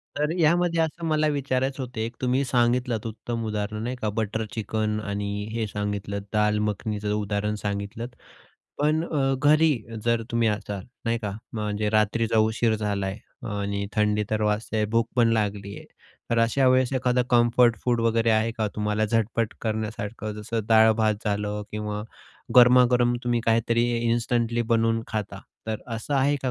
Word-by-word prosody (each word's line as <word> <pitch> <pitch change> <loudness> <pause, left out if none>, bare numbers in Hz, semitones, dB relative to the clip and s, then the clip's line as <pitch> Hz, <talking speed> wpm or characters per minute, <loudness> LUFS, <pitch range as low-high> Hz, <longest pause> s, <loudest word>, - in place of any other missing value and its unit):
तर 150 +1 0
यामध्ये 170 +1 +3
असं 165 +1 -2
मला 155 -1 +2
विचारायचं 135 -2 -1
होतं 125 -3 -7
एक, 115 +2 -2
तुम्ही 130 +2 +1
सांगितलंत 120 -2 +1
उत्तम 115 +1 -5
उदाहरण 105 0 -3
नाही 125 +2 -3
का? 110 -3 -2
बटर 110 +1 -2
चिकन 110 -1 -1
आणि 100 0 -3
हे 115 -1 -1
सांगितलंत 100 0 -3
दाल 105 0 +2
मखनीचं 105 0 -2
उदाहरण 105 0 -1
सांगितलंत. 100 +3 -4 0.7
पण 155 +2 +2
अ, 135 -5 0
घरी 150 +1 +4 0.3
जर 115 -1 +2
तुम्ही 115 -1 +2
असाल 105 -2 -3 0.2
नाही 115 0 0
का? 105 -3 -4 0.2
म्हणजे 105 -1 -2
रात्रीचा 110 +1 +2
उशीर 110 +1 +2
झालाय, 100 -2 -2 0.2
आणि 100 -1 -3
थंडी 105 0 +1
तर 110 0 0
वाजतेय 105 +1 0
आहे, 105 - +1
भूक 115 0 +2
पण 120 -1 +5
लागली 100 -2 -1
आहे, - - -10 0.5
तर 115 - +2
अशा 120 +4 +3
वेळेस 130 0 +3
एखादं 125 -1 +2
कम्फर्ट 120 0 +4
फूड 120 -2 +2
वगैरे 115 0 +2
आहे 110 +1 +2
का? 110 - +1
तुम्हाला 105 0 0
झटपट 115 +1 0
करण्यासारखं. 110 -1 -3
जसं 115 +2 -2
डाळ-भात 110 -1 +5
झालं 105 0 -1
किंवा 105 -1 -3 0.5
गरमागरम 125 0 +6
तुम्ही 120 -1 +1
काहीतरी 115 +1 +2 0.3
इन्स्टंटली 120 0 +1
बनवून 115 0 +2
खाता. 105 -2 -4 0.3
तर 110 -1 -3
असं 115 +4 -4
आहे 140 +2 +3
का 130 - 0
115 Hz, 155 wpm, -25 LUFS, 105-120 Hz, 0.7 s, गरमागरम